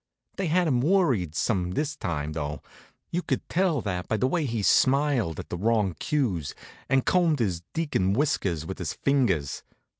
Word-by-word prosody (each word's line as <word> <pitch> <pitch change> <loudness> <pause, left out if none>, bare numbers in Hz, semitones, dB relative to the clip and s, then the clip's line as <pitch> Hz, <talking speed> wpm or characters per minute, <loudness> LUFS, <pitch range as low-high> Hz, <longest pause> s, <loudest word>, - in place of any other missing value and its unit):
They 195 - -1
had 175 +2 +2
him 125 -5 +2
worried 135 - +2
some 90 -4 0
this 150 +4 -1
time, 75 - -3
though. 75 -2 -4 0.5
You 175 - 0
could - - -2
tell 175 -6 +1
that 90 -4 -3
by 110 - 0
the 125 - +1
way 155 +4 +1
he 115 -3 -2
smiled 130 - +3
at - - -7
the 90 - -3
wrong 105 -3 +2
cues, 100 - -1 0.3
and 135 -1 +2
combed 170 -4 +3
his 95 -9 -1
deacon 145 - +1
whiskers 100 - 0
with - - -6
his - - -3
fingers. 120 - 0
120 Hz, 175 wpm, -26 LUFS, 90-150 Hz, 0.5 s, smiled